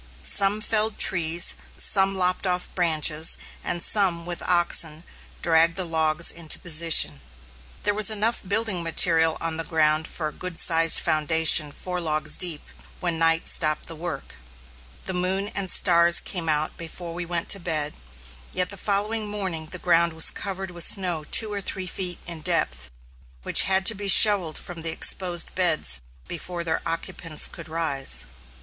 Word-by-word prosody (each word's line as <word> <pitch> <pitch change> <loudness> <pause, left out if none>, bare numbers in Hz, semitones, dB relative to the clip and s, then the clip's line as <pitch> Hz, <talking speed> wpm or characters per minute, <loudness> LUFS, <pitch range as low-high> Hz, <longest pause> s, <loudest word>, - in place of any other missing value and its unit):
Some 195 - +4
felled 215 0 +1
trees, 170 -1 +1 0.2
some 195 -1 +4
lopped 185 +1 0
off 180 0 -1
the - - -18
branches, 160 -2 +1 0.3
and 175 - -4
some, 180 -5 +1
with 175 -1 -6
oxen, 170 -2 0 0.4
dragged 165 0 +2
the 185 -1 -1
logs 160 0 0
into 170 -2 -4
position. 160 - +3 0.6
There 205 - 0
was 210 0 +3
enough 220 +2 -1
building 200 -2 0
material 165 -1 +2
on 165 -1 -3
the 165 - -4
ground 155 -1 0
for 155 - -3
a - - -15
good 180 -2 -6
sized 165 0 +5
foundation 155 -1 +3
four 180 +3 -3
logs 155 -2 +2
deep, 170 -5 -2 0.4
when 170 -3 -4
night 165 0 +1
stopped 155 -2 +1
the 165 - -8
work. 160 -3 -8 0.7
The 190 - -4
moon 190 +3 -3
and 200 -3 -3
stars 170 -2 +5
came 170 -4 -4
out 155 0 -1
before 170 +1 -9
we 175 +1 -6
went 170 -1 -3
to 200 - +1
bed, 155 -4 -2 0.6
yet 180 0 -2
the 200 - -6
following 210 +3 -1
morning 190 -6 -5
the 180 - -7
ground 170 -1 +1
was 160 0 +3
covered 190 -2 -6
with 170 -1 -1
snow 175 -6 0
two 215 -2 +3
or 200 - -3
three 190 0 -5
feet 180 -1 -4
in 170 -2 -9
depth, 65 - -1 0.5
which - - +3
had 190 0 +1
to 225 - +4
be 205 -1 -8
shovelled 195 -4 +5
from 175 -2 -7
the 165 0 -2
exposed 175 0 -1
beds 155 - +1 0.3
before 175 0 -6
their 160 -1 -3
occupants 165 -1 -2
could - - -10
rise. 135 - -1
170 Hz, 165 wpm, -23 LUFS, 160-190 Hz, 0.7 s, sized